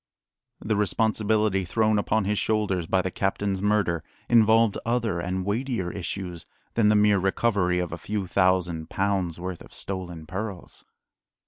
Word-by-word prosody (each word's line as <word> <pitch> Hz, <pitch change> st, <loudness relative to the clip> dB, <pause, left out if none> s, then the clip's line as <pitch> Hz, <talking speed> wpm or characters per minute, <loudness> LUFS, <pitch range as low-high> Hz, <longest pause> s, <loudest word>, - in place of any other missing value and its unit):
The 110 Hz, -, -1 dB
responsibility 105 Hz, -1 st, +1 dB
thrown 110 Hz, +3 st, +2 dB
upon 105 Hz, 0 st, 0 dB
his 105 Hz, +1 st, 0 dB
shoulders 100 Hz, -6 st, 0 dB
by 95 Hz, +1 st, +2 dB
the 95 Hz, -, -2 dB
captain's 95 Hz, 0 st, -1 dB
murder 100 Hz, -6 st, +1 dB, 0.2 s
involved 115 Hz, -2 st, +4 dB
other 115 Hz, -6 st, 0 dB
and 90 Hz, +2 st, -2 dB
weightier 105 Hz, -3 st, -1 dB
issues 90 Hz, -2 st, -5 dB, 0.3 s
than 110 Hz, -2 st, +3 dB
the 105 Hz, -, +4 dB
mere 105 Hz, -1 st, +4 dB
recovery 95 Hz, -2 st, +1 dB
of 90 Hz, -2 st, -2 dB
a 80 Hz, -, -5 dB
few 100 Hz, +3 st, -3 dB
thousand 90 Hz, -3 st, +1 dB
pounds' 95 Hz, -4 st, -1 dB
worth 90 Hz, -1 st, -5 dB
of -, -, -12 dB
stolen 90 Hz, -4 st, -5 dB
pearls. 95 Hz, +2 st, -6 dB
100 Hz, 145 wpm, -26 LUFS, 90-105 Hz, 0.3 s, involved